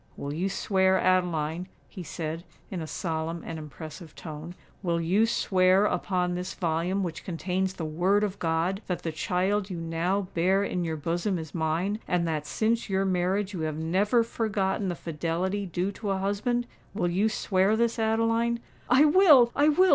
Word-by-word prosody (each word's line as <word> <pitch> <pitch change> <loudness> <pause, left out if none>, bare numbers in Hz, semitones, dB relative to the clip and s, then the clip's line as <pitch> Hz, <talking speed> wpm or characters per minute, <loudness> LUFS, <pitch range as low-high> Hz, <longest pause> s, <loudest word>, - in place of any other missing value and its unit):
"Will 140 +1 -4
you 180 +5 -1
swear, 190 -1 +2
Adeline," 175 -2 +1 0.2
he 185 - -9
said, 165 -1 -5 0.3
in 185 -3 -3
a 160 - -5
solemn 165 +1 -3
and 165 -1 -5
impressive 155 +2 -9
tone,—"will 170 +2 -5
you 190 +7 +3
swear 190 -2 +3
upon 180 -1 0
this 180 +1 -4
volume 175 +3 0
which 170 -2 -5
contains 185 +2 -2
the 165 - -4
Word 180 +7 +2
of 200 -1 -2
God, 165 +4 0
that 180 - -3
the 165 - -2
child 190 +5 0
you 180 - -4
now 165 +4 0
bear 190 +4 +2
in 180 -3 -1
your 160 -1 -2
bosom 175 +5 -1
is 160 -2 -7
mine, 170 +6 -1
and 175 -1 +1
that 155 -2 -2
since 225 0 0
your 195 0 +1
marriage 190 +2 0
you 180 - -4
have 155 -1 -2
never 195 +9 +2
forgotten 210 -3 -1
the 175 - -2
fidelity 170 +5 -2
due 180 +3 -1
to 205 +1 -5
a 195 - +1
husband? 205 +5 0 0.3
Will 175 -5 0
you 200 +5 +2
swear 195 -1 +2
this, 235 0 +1
Adeline?" 230 +1 +1 0.3
"I 265 +5 +6
will—I 295 -5 +6
will!" 370 +5 +5
185 Hz, 170 wpm, -27 LUFS, 165-205 Hz, 0.3 s, I